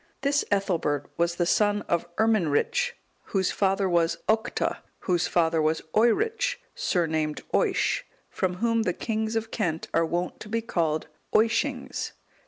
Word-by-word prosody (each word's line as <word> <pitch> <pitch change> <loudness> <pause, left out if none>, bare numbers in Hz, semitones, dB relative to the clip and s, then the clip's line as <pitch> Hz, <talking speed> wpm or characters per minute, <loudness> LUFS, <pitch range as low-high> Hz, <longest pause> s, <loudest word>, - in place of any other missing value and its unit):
This 280 +1 +2
Ethelbert 170 -8 0
was 170 0 +1
the 175 - +1
son 205 +3 +2
of 170 0 -1
Irminric, 225 - +2 0.3
whose 190 -2 0
father 195 0 +1
was 170 -2 +2
Octa, 220 0 +1 0.2
whose 180 -2 +1
father 165 -2 +2
was 155 +1 +1
Oeric, 450 - +2 0.2
surnamed 160 - 0
Oisc, - - +2 0.3
from 185 -2 -1
whom 230 +3 +1
the 185 -5 0
kings 220 +2 -2
of 225 0 -2
Kent 165 -7 -2
are 165 - +3
wont 175 +2 -2
to 215 - -9
be 230 +1 -1
called 160 -7 0 0.3
Oiscings. 245 +4 +1
195 Hz, 140 wpm, -26 LUFS, 170-225 Hz, 0.3 s, are